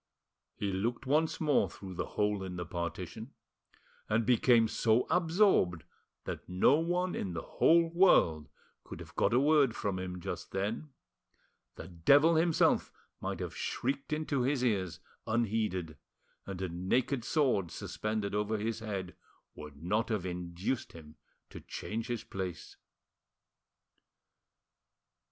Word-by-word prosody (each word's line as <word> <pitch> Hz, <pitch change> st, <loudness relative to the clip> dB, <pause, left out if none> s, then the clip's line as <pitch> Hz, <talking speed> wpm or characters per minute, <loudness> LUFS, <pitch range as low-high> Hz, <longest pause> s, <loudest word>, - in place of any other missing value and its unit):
He 100 Hz, -2 st, -2 dB
looked 115 Hz, +7 st, -2 dB
once 155 Hz, +4 st, +1 dB
more 150 Hz, -3 st, +2 dB
through 95 Hz, -2 st, -9 dB
the -, -, -3 dB
hole 105 Hz, -1 st, +1 dB
in 95 Hz, -1 st, -5 dB
the 90 Hz, 0 st, -4 dB
partition, 85 Hz, +1 st, -5 dB, 0.7 s
and 110 Hz, +1 st, +2 dB
became 120 Hz, -1 st, +4 dB
so 110 Hz, +2 st, +2 dB
absorbed 165 Hz, -, +3 dB, 0.4 s
that -, -, -6 dB
no 95 Hz, +11 st, +4 dB
one 175 Hz, +2 st, 0 dB
in 95 Hz, -, -3 dB
the 85 Hz, -, -4 dB
whole 165 Hz, +1 st, +4 dB
world 85 Hz, -, +4 dB, 0.3 s
could -, -, -9 dB
have -, -, -11 dB
got -, -, +2 dB
a 120 Hz, -, +4 dB
word 145 Hz, -4 st, +4 dB
from 100 Hz, -2 st, -2 dB
him 90 Hz, -1 st, -5 dB
just -, -, -6 dB
then; 105 Hz, +10 st, -2 dB, 0.9 s
the -, -, -9 dB
devil 140 Hz, -, +4 dB
himself 165 Hz, 0 st, +3 dB, 0.3 s
might -, -, -4 dB
have -, -, -5 dB
shrieked 135 Hz, +3 st, -3 dB
into 150 Hz, -3 st, -1 dB
his 130 Hz, 0 st, +1 dB
ears 95 Hz, -7 st, -1 dB, 0.3 s
unheeded, 105 Hz, -8 st, -1 dB, 0.5 s
and 95 Hz, -1 st, -5 dB
a -, -, -1 dB
naked 115 Hz, +9 st, 0 dB
sword 125 Hz, -, +1 dB
suspended 110 Hz, +3 st, -3 dB
over 105 Hz, +1 st, 0 dB
his 110 Hz, +2 st, -2 dB
head 100 Hz, -5 st, -5 dB, 0.4 s
would 75 Hz, 0 st, -11 dB
not 105 Hz, +7 st, 0 dB
have 105 Hz, -5 st, -1 dB
induced 90 Hz, +6 st, -3 dB
him 80 Hz, -2 st, -12 dB, 0.4 s
to -, -, -9 dB
change 115 Hz, +2 st, -5 dB
his 120 Hz, -3 st, -3 dB
place. 90 Hz, -4 st, -6 dB
110 Hz, 135 wpm, -32 LUFS, 90-135 Hz, 0.9 s, became